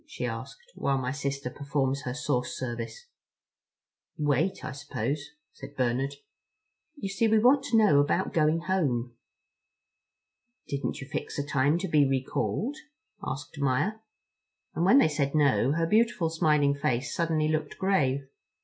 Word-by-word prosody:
she - - -5
asked, 480 0 -7
"while 140 -1 0
my 130 -1 -2
sister 140 -2 -3
performs 140 -1 -1
her 125 - -2
source 140 -4 -1
service?" 120 - -5 1.1
"Wait, 150 +6 0
I - - -4
suppose," 145 +1 -4 0.2
said 140 +1 -11
Bernard. 130 +2 0 0.8
"You 285 - -5
see 200 +4 +1
we 220 0 +4
want 260 +5 +5
to 230 - +2
know 205 -10 +5
about 160 +6 +1
going 155 +1 +2
home." 130 -11 -1 1.5
"Didn't 140 0 -3
you 140 - -8
fix - - -4
a 145 - -2
time 145 +2 +2
to 190 +2 -3
be 150 -4 +3
recalled?" 180 - -1 0.5
asked 135 -3 -6
Maia. 140 +11 0 0.7
And 170 - 0
when 200 +8 +6
they 275 - +6
said 145 -2 -1
no, 140 -3 +3
her 165 +1 +1
beautiful 210 -4 +2
smiling 150 -4 +3
face 130 -3 -1
suddenly 160 -2 +1
looked 155 0 -2
grave. 140 -9 +1
145 Hz, 145 wpm, -28 LUFS, 135-175 Hz, 1.5 s, when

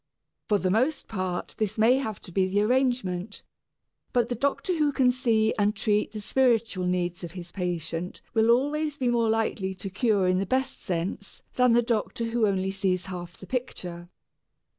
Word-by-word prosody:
For 210 - +3
the 185 -2 0
most 260 +9 +1
part 185 -4 -3
this 215 0 -1
may 230 +4 +5
have 220 -7 -4
to - - -11
be 185 +1 +2
the 200 +2 +1
arrangement, 220 -5 0 0.7
but 240 -2 +2
the - - 0
doctor 280 - 0
who 300 -2 +2
can 260 -2 +3
see 230 -4 +2
and 205 +1 +2
treat 210 0 +1
the 215 -1 -6
spiritual 225 -6 +1
needs 180 -1 -1
of 170 -1 -6
his 175 -2 -8
patient 175 -1 -3
will 225 0 +3
always 290 +4 +2
be 255 -3 +1
more 235 -2 +2
likely 215 -4 0
to 190 +1 -6
cure 205 -2 +2
in 185 0 +2
the 195 - -2
best 260 +4 0
sense 180 +3 -4
than 250 -2 +4
the 240 +1 +4
doctor 230 0 -1
who 230 -1 +1 0.2
sees 190 -2 -1
only 190 - -8
half 175 -1 -7
of - - -21
the - - -8
picture. 180 -8 -5
215 Hz, 185 wpm, -27 LUFS, 185-245 Hz, 0.7 s, may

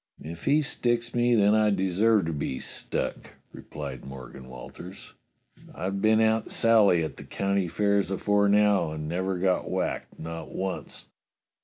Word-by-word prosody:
"If 85 +2 -8
he 150 +2 +3
sticks 120 -3 -1
me, 120 0 +3
then 105 -1 +4
I 110 0 +4
deserves 100 +1 +2
to 80 - -2
be 70 -3 -3
stuck," - - -4 0.2
re - - -10
plied 70 -4 -7
Morgan 65 -1 -10
Walters. 85 +9 -11 0.6
"I've 95 +1 -3
been 110 +1 +4
Aunt 110 0 +2
Sally 105 -7 +4
at 80 - -5
the - - -9
county 100 -2 -1
fairs 100 +2 +1
afore 100 +1 +2
now, 105 -4 +3
and 75 -1 -5
never 95 +3 -2
got 90 0 0
whacked, - - -3
not 80 +1 -7
once. 95 0 -5
100 Hz, 155 wpm, -27 LUFS, 80-110 Hz, 0.6 s, then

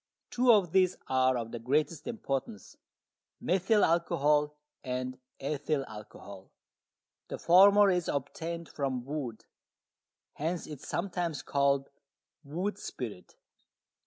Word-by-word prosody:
Two 245 0 +4
of 200 -7 +4
these 185 0 +3
are 130 -1 +3
of 115 -1 -5
the 120 - -5
greatest 145 +6 0
importance, 135 - -4 0.6
methyl 195 +4 +3
alcohol 150 -3 +2 0.3
and 130 0 -4 0.2
ethyl 145 0 -1
alcohol. 100 -2 -11 0.8
The - - -5
former 200 +3 +6
is 180 -2 0
obtained 165 +3 -4
from 130 -4 -3
wood, 135 -6 -5 0.9
hence 165 +3 -3
it 150 -3 -8
is - - -11
sometimes 175 -5 -2
called 140 -1 +1 0.5
wood 175 +8 -3
spirit. - - -7
150 Hz, 110 wpm, -30 LUFS, 135-180 Hz, 0.9 s, former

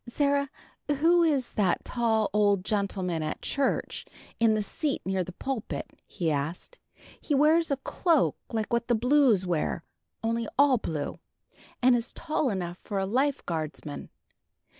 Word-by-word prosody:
"Sarah, 280 +2 +1 0.4
who 325 +5 +4
is 290 -7 +1
that 190 -4 +1
tall 225 -3 +1
old 205 -3 +3
gentleman 190 -5 -1
at 155 - -4
church, 280 -1 -1 0.4
in 225 -1 +4
the 215 - 0
seat 290 +7 -1
near 190 0 0
the 180 - -8
pulpit?" 255 +4 -4 0.2
he 165 -3 -1
asked. 155 - -3 0.4
"He 295 - -1
wears 315 +4 +4
a 280 - +1
cloak 320 +2 +1 0.2
like 220 0 -2
what 235 0 +1
the 240 - +3
Blues 245 -4 +4
wear, 170 -1 -1 0.4
only 230 0 0
all 275 -3 +5
blue, 155 -7 -4 0.6
and 255 0 +6
is 235 0 -2
tall 310 -4 -1
enough 180 -4 -3
for 205 - -5
a 195 - +1
Life 270 +7 0
guardsman. 155 -2 -5
230 Hz, 150 wpm, -28 LUFS, 190-280 Hz, 0.6 s, and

